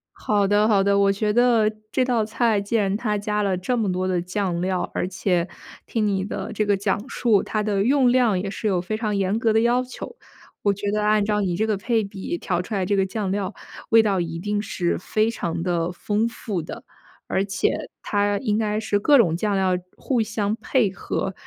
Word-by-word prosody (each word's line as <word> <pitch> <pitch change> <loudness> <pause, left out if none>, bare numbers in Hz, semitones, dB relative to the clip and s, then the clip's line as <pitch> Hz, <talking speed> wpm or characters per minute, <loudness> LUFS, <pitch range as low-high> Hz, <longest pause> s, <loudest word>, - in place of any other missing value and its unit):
好 205 -2 +1
的 205 +1 +3
好 200 -3 +4
的， 200 0 +3
我 200 0 +4
觉 210 +1 0
得 235 -2 +4 0.2
这 260 - +2
道 240 -4 +1
菜 225 -1 +1
既 200 +3 -3
然 200 -3 +2
它 210 -2 -1
加 210 +1 -1
了 195 -3 0
这 245 +8 -1
么 215 -5 0
多 185 +1 -1
的 180 -2 0
酱 180 -1 -2
料， 185 0 -1
而 - - -1
且 180 -1 0 0.4
听 220 -2 -1
你 195 -2 0
的 - - -5
这 215 0 0
个 205 -1 +3
讲 200 +3 -1
述， 225 -7 +2
它 215 -1 -2
的 205 -2 +1
用 260 +1 +4
量 240 -7 +3
也 195 +1 -3
是 215 - -3
有 185 -4 +1
非 215 +4 -3
常 215 -2 -1
严 200 +2 0
格 230 -2 +2
的 220 - +4
要 240 +2 +3
求。 255 - -9 0.4
我 205 - +2
觉 200 +1 -3
得 210 0 0
按 210 0 +3
照 210 0 0
你 185 -4 0
这 215 - +1
个 215 -2 0
配 225 +2 0
比 195 -3 -5
调 175 0 -1
出 195 +5 -8
来 190 -2 0
这 200 +2 +1
个 195 - +3
酱 190 0 -3
料， 200 0 -2 0.4
味 225 0 +6
道 200 -3 +1
一 165 -1 -3
定 205 +3 -1
是 180 -4 -1
非 215 +4 0
常 170 -6 -3
地 170 -1 0
丰 210 +5 -1
富 215 -5 -4
的。 160 - -8 0.5
而 190 - +1
且 195 -1 0 0.3
它 205 0 0
应 215 -5 0
该 215 -1 0
是 215 -1 0
各 290 +7 +4
种 170 -7 +3
酱 205 +1 0
料 185 -1 +2 0.2
互 255 -3 -1
相 215 -1 -1
配 230 -4 +1
合， 195 0 -3
205 Hz, 240 characters per minute, -23 LUFS, 190-220 Hz, 0.5 s, 味